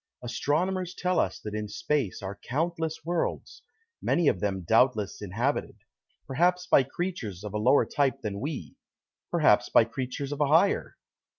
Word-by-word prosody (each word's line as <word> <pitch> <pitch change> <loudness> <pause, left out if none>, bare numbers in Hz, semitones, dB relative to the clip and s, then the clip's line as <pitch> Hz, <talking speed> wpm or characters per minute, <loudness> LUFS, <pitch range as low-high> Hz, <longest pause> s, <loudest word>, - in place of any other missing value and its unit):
Astronomers 170 +10 -1
tell 180 0 0
us - - 0
that 105 - -6
in 105 0 -3
space 110 -1 -2
are 95 +1 -6
countless 160 +3 -2
worlds, 170 0 -2 0.4
many 170 -3 +2
of 95 - +3
them 95 -2 -2
doubtless 110 +1 +2
inhabited 115 +8 -2 0.5
perhaps 180 +6 +1
by - - +5
creatures 130 - -4
of 105 -1 -6
a 105 - -1
lower 125 +6 +4
type 140 -2 0
than 100 -2 -3
we, 145 +2 -5 0.6
perhaps - - +3
by - - +6
creatures 130 +4 -5
of 145 0 -3
a 145 - +4
higher. 165 +7 +2
135 Hz, 155 wpm, -28 LUFS, 105-165 Hz, 0.6 s, by